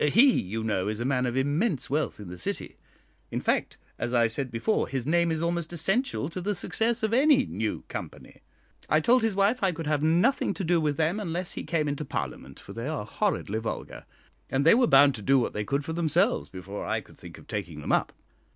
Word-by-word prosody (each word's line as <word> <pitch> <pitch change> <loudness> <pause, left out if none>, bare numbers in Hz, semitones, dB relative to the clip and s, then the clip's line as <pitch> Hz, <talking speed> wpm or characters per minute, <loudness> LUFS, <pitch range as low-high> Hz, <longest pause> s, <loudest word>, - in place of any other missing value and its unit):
He, 260 - +7
you 110 +4 -4
know, 100 -3 0
is 105 +1 -2
a 120 - -2
man 130 -2 +1
of 120 +1 -2
immense 145 - 0
wealth 150 -2 -1
in 105 - -8
the 90 0 -8
City - - -4 0.5
in - - -2
fact, - - 0 0.2
as 120 +1 -1
I 120 -1 +5
said 125 +4 -2
before, 120 - 0
his 135 -3 -3
name 170 +2 +2
is 160 0 -1
almost 170 -1 -1
essential 195 - 0
to 180 +2 -5
the 205 +3 -1
success 225 +4 -1
of 220 0 +1
any 270 +1 +5
new 110 -1 -3
company. - - -8 0.5
I 155 - +4
told 245 +10 +4
his 220 -3 0
wife 205 +6 +2
I 190 - +3
could 165 -1 -6
have 150 -1 0
nothing 175 - +2
to 195 - -4
do 170 -1 +2
with 150 -2 0
them 165 +6 +1
unless 180 -2 -3
he - - -4
came 155 -2 0
into 145 +1 -2
Parliament, 70 - -5
for - - -11
they 115 +3 -5
are 150 -9 -3
horridly 110 - -1
vulgar, 110 - -6 0.4
and 135 +2 0
they 165 - +8
were 245 +1 +4
bound 145 -7 +6
to 110 - -7
do 135 +6 +4
what 125 - 0
they 105 - -2
could 140 +6 -1
for 160 - -4
themselves 175 +7 +1
before 100 +2 -7
I - - -1
could - - -17
think - - -11
of - - -15
taking - - -5
them - - -3
up. - - +2
155 Hz, 230 wpm, -27 LUFS, 125-195 Hz, 0.5 s, they